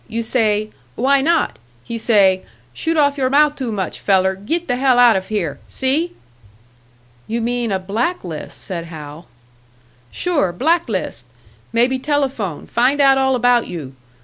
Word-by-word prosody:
You 230 +1 -3
say, 215 -2 0 0.2
'Why 270 +3 +3
not?' 330 +3 +1 0.2
He 230 - -5
say, 195 -5 +3 0.3
'Shoot 325 - -1
off 285 -1 +2
your 260 -1 +1
mouth 295 +2 +4
too 255 -4 -4
much, 195 -3 -3
feller. 190 -1 +2
Git 320 - -3
the 245 -2 0
hell 260 -1 +3
out 245 -2 +6
of 190 0 -2
here!' 170 -10 -2
See?" 300 +7 -1 1.1
"You 230 +2 -2
mean 240 -1 -1
a 190 - +1
black 220 - -2
list," 165 -4 -7
said 170 -3 -5
Hal. 155 -1 -10 0.8
"Sure, 300 - 0
black 320 - +1
list. 185 - -3 0.5
Maybe 245 +3 +2
telephone, 265 - -2
find 255 +5 +1
out 270 -1 +5
all 265 0 +2
about 245 -1 +3
you. 145 -7 -7
235 Hz, 155 wpm, -19 LUFS, 190-275 Hz, 1.1 s, out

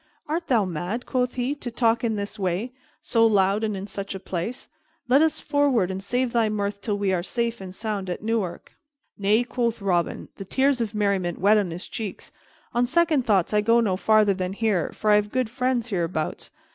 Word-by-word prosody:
"Art 330 +3 -2
thou 230 -6 +3
mad," 180 +7 -4
quoth 250 -1 -1
he, 255 +2 0
"to 280 -4 -6
talk 230 0 +1
in 225 -2 +1
this 205 0 -4
way, 190 +6 -1 0.3
so 230 -1 +2
loud 205 -1 +3
and 215 -2 -1
in 190 - -5
such 200 -1 -5
a - - -5
place? 190 +7 -4 0.4
Let 265 +4 +5
us 315 -1 +2
forward, 280 -10 +2
and 190 0 -4
save 245 +5 -1
thy 230 -2 +3
mirth 200 -1 -2
till 205 0 -1
we 200 -2 0
are 180 - +1
safe 235 +3 -2
and 190 - -7
sound 205 -3 -3
at 180 - -4
Newark." 215 -6 -2 0.4
"Nay," 210 +4 +3
quoth 235 -2 -1
Robin, 180 -4 -1
the 195 - -6
tears 265 +4 +2
of 220 -2 -3
merriment 195 -4 0
wet 210 +3 +4
on 195 -4 -1
his 170 +2 -6
cheeks, 215 -5 -6 0.4
"on 245 +1 +2
second 315 -3 +2
thoughts 195 -3 +2
I 210 - +4
go 230 +2 +4
no 205 -5 +1
farther 215 +1 +4
than 185 0 -3
here, 205 -5 0
for 215 - 0
I 210 - +7
have 210 0 -1
good 255 -3 -1
friends 250 -2 0
hereabouts. 165 -4 -2
215 Hz, 210 wpm, -25 LUFS, 195-240 Hz, 0.4 s, I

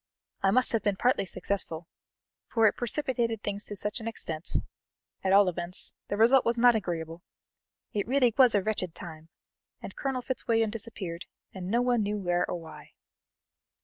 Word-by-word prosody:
I 195 - +3
must 255 +5 +3
have 230 -2 +1
been 205 -2 +1
partly 245 0 +2
successful, 170 -3 -3 0.6
for 225 -2 +2
it 210 - +5
precipitated 240 -3 -1
things 205 0 -3
to 205 - -5
such 210 +4 -3
an 225 - -6
extent 165 -8 -4 0.7
at 190 - +1
all 200 0 +7
events, 175 +1 -2
the 205 - -2
result 240 +4 +6
was 235 +1 +1
not 240 0 +6
agreeable. 170 -4 -3 0.7
It 205 0 -1
really 250 -2 +3
was 255 -5 +6
a 200 - +2
wretched 185 -5 -2
time! 160 -2 -9 0.5
and - - -9
Colonel 265 -2 -2
Fitzwilliam 225 -4 0
disappeared 195 -6 -6 0.3
and 185 -2 -6
no 235 +4 +2
one 245 -2 +2
knew 210 0 -1
where 175 -2 0
or 175 - -2
why." 160 -1 -12
210 Hz, 170 wpm, -29 LUFS, 180-235 Hz, 0.7 s, all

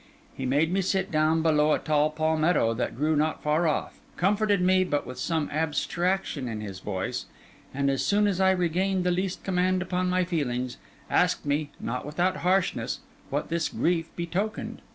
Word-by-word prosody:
He 130 - -3
made 150 +6 +2
me 195 - +2
sit 190 0 0
down 155 +1 +2
below 150 -1 +4
a - - +3
tall 150 -1 +2
palmetto 155 -4 +2
that 120 +2 -2
grew 155 +3 +1
not 155 +1 0
far 155 +3 +2
off; 155 - -2 0.2
comforted 205 +2 +2
me, 185 +1 +4
but 145 -5 -1
with 125 +1 -8
some 160 -3 0
abstraction 160 0 -1
in 110 -2 -4
his 100 -3 -6
voice; 95 -1 -3 0.4
and 140 +1 -1
as 135 -1 +1
soon 210 +1 +3
as 195 -2 +1
I 190 - +5
regained 185 +1 +1
the 180 - +2
least 185 +1 -2
command 185 0 +1
upon 185 0 -1
my 185 0 +2
feelings, 130 -8 -2 0.3
asked - - +2
me, 145 +1 0
not 125 +2 -3
without 175 +6 0
harshness, 185 +1 0 0.3
what 145 +2 -2
this 165 -1 0
grief 165 -1 0
betokened. 180 +5 -3
165 Hz, 175 wpm, -27 LUFS, 145-185 Hz, 0.4 s, I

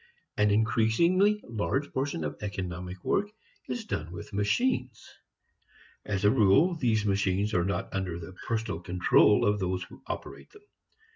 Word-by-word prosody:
An 105 0 +3
increasingly 115 - +3
large 125 +5 -2
portion 130 - -2
of 75 - -3
economic 90 -3 -5
work 205 +1 +1 0.4
is 235 -3 -3
done 80 - -4
with 105 +4 -9
machines. 125 - 0 1.0
As 100 0 -2
a 105 - +6
rule, 135 - +4
these 115 -9 0
machines 100 +1 0
are 90 - +2
not 100 +3 -3
under 95 -3 -2
the 85 +2 -9
personal 110 -6 -2
control 90 +3 +3
of 105 0 +2
those 95 -1 -1
who 90 - -14
operate - - -7
them. 420 0 -17
105 Hz, 145 wpm, -28 LUFS, 95-125 Hz, 1.0 s, a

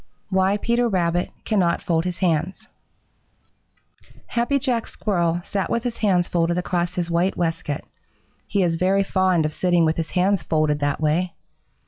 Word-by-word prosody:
II - - -1
WHY 190 +2 +3
PETER 235 +2 +1
RABBIT 175 -2 0 0.2
CANNOT 185 -6 +2
FOLD 165 -1 0
HIS 180 -1 -3
HANDS 175 0 -1 1.6
Happy 240 +4 0
Jack 250 -4 0
Squirrel 175 -4 -1
sat 195 -2 -2
with 235 - 0
his 245 -2 -3
hands 185 -4 +2
folded 170 0 0
across 180 -1 -1
his 175 -1 -2
white 175 +3 +1
waistcoat. 165 -4 -2 0.7
He 200 - +1
is 165 -2 +1
very 190 +3 +2
fond 185 -4 +2
of 155 - -2
sitting 175 -1 +2
with 160 0 +1
his 160 -1 -2
hands 190 0 +1
folded 155 -1 +1
that 145 -1 -1
way. 165 +4 +1
180 Hz, 160 wpm, -22 LUFS, 165-195 Hz, 1.6 s, WHY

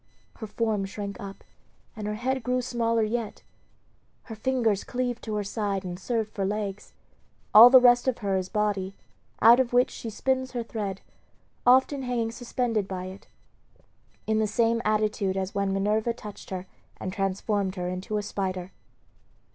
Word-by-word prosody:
Her 220 - -6
form 215 -2 -1
shrank 200 0 -6
up, 195 -1 -9 0.5
and 210 -1 -5
her 210 - -2
head 260 +4 -1
grew 250 +2 0
smaller 230 -2 0
yet; 220 0 -3 0.8
her 225 - -9
fingers 225 -3 0
cleaved 245 -1 -3
to 215 -2 -3
her 210 - -1
side 200 -1 -2
and 180 0 -5
served 220 +1 -2
for 195 - -2
legs. 205 0 -3 0.6
All 225 +3 +11
the 260 0 +9
rest 245 0 +5
of 255 - +1
her 200 -3 -1
is 185 0 -2
body, 205 -3 -1 0.5
out 235 +3 +8
of 245 -2 0
which 245 +1 +4
she 230 - -6
spins 260 +3 -1
her 240 -2 -2
thread, 205 -4 -4 0.7
often 265 +2 +5
hanging 240 -3 -1
suspended 235 -3 -2
by 185 -1 -5
it, 195 - -16 1.0
in 220 0 +1
the 215 - +2
same 230 +2 +1
attitude 210 -2 0
as 190 0 -3
when 200 -1 0
Minerva 210 +4 +1
touched 210 -3 -10
her 185 -1 -5 0.3
and 185 - -5
transformed 195 0 -1
her 180 -1 -3
into 185 +4 -3
a 210 - -2
spider. 185 -2 -3
215 Hz, 165 wpm, -27 LUFS, 195-240 Hz, 1.0 s, All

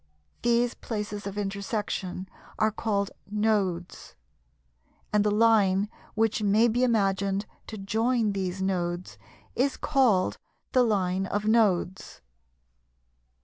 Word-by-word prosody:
These 240 0 +2
places 210 -2 -5
of 200 +1 -6
intersection 195 -2 -3 0.3
are 220 0 +2
called 200 -2 -1 0.2
"Nodes," 205 -5 -1 1.0
and 210 -1 +4
the 210 - +2
line 210 -2 +3 0.3
which 220 0 +1
may 210 +3 +4
be 240 +2 +1
imagined 200 -3 +1 0.2
to 220 - -7
join 220 +3 +1
these 190 -1 -3
Nodes 175 -2 -2 0.4
is 270 +2 +1
called 250 -11 +2 0.3
the 255 - +4
"Line 190 -4 +1
of 205 +2 -2
Nodes." 200 -5 +1
205 Hz, 105 wpm, -27 LUFS, 195-225 Hz, 1.0 s, and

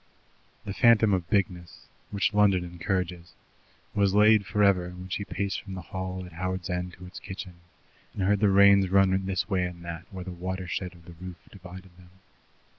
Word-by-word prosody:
The 100 - -4
phantom 115 -2 +5
of 90 -3 -1
bigness, 90 -4 -1 0.2
which 100 +1 0
London 100 -3 +4
encourages, 90 0 -3 0.6
was 100 -1 +2
laid 105 -1 +5
for 105 +2 +1
ever 90 -3 +3
when 90 +1 -10
she 100 - -2
paced 100 -1 -3
from 95 -2 -8
the 95 - -7
hall 95 0 -4
at 90 - -12
Howards 95 +1 -3
End 90 0 -3
to 90 - -12
its 90 - -9
kitchen 95 -1 -8 0.6
and 95 - -2
heard 100 +1 +2
the 105 -1 +4
rains 100 -1 +6
run 95 0 +3
this 95 -1 -1
way 95 -4 0
and 90 -1 -6
that 85 +1 -7
where 95 -2 -6
the 95 - -6
watershed 90 +1 -4
of 85 -1 -18
the 85 - -11
roof 90 -1 -7
divided 95 -1 -12
them. 90 -1 -17
95 Hz, 190 wpm, -27 LUFS, 90-100 Hz, 0.6 s, rains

